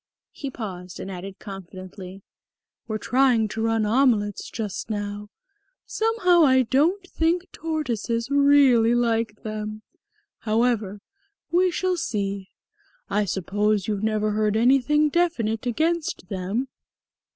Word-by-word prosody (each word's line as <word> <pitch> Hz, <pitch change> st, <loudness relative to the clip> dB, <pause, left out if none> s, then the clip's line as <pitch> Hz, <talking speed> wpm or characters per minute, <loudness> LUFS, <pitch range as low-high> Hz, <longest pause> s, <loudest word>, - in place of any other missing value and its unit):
He 280 Hz, -, -6 dB
paused 185 Hz, -8 st, -7 dB
and 195 Hz, -, -6 dB
added 190 Hz, +1 st, -7 dB
confidently. 190 Hz, 0 st, -10 dB, 0.6 s
"We're 215 Hz, -1 st, -2 dB
trying 245 Hz, -1 st, +2 dB
rum 225 Hz, -1 st, +1 dB
omelettes 215 Hz, -3 st, +1 dB
just 215 Hz, -2 st, -5 dB
now. 205 Hz, -1 st, -4 dB, 0.6 s
Somehow 400 Hz, -7 st, +3 dB
I 260 Hz, -3 st, +5 dB
don't 320 Hz, -, +1 dB
think 340 Hz, +1 st, 0 dB
tortoises 245 Hz, -6 st, -3 dB
really 280 Hz, -5 st, +5 dB
like 230 Hz, -3 st, 0 dB
them. 215 Hz, 0 st, -5 dB, 0.6 s
However, 215 Hz, -3 st, 0 dB, 0.5 s
we 365 Hz, +2 st, +4 dB
shall 365 Hz, +1 st, -1 dB
see. 200 Hz, -, -3 dB, 0.6 s
I 210 Hz, +1 st, +2 dB
suppose 205 Hz, +2 st, 0 dB
you've 205 Hz, -2 st, -1 dB
never 215 Hz, -1 st, 0 dB
heard 215 Hz, 0 st, +1 dB
anything 275 Hz, +5 st, +3 dB
definite 250 Hz, -10 st, 0 dB
against 320 Hz, -, -1 dB
them?" 195 Hz, +7 st, -2 dB
225 Hz, 110 wpm, -24 LUFS, 205-275 Hz, 0.6 s, I